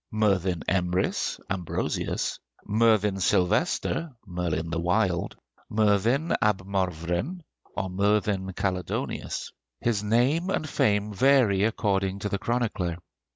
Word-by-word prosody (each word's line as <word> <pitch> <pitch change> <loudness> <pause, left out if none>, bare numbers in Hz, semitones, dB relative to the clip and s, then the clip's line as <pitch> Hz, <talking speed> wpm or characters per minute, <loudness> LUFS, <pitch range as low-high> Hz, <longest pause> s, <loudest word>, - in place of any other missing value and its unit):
Merddin 95 -5 +1
Emrys 90 0 0
(Ambrosius), 90 -4 -2 0.3
Merddin 105 -2 +3
Sylvester 135 - +1 0.2
(Merlin 85 -3 -2
the 85 - -1
Wild), 90 0 0 0.3
Merddin 110 - +2
ab 100 -3 +1
Morvryn 95 - -2 0.4
(or 95 - -1
Merlin 100 0 +1
Caledonius), 90 -1 -3 0.3
his 115 -4 0
name 130 - +2
and 155 -5 -1
fame 105 -5 +1
vary 115 -4 +4
according 100 -3 0
to 105 +1 -3
the 100 - -2
chronicler. 105 -8 -1
100 Hz, 105 wpm, -26 LUFS, 90-110 Hz, 0.4 s, vary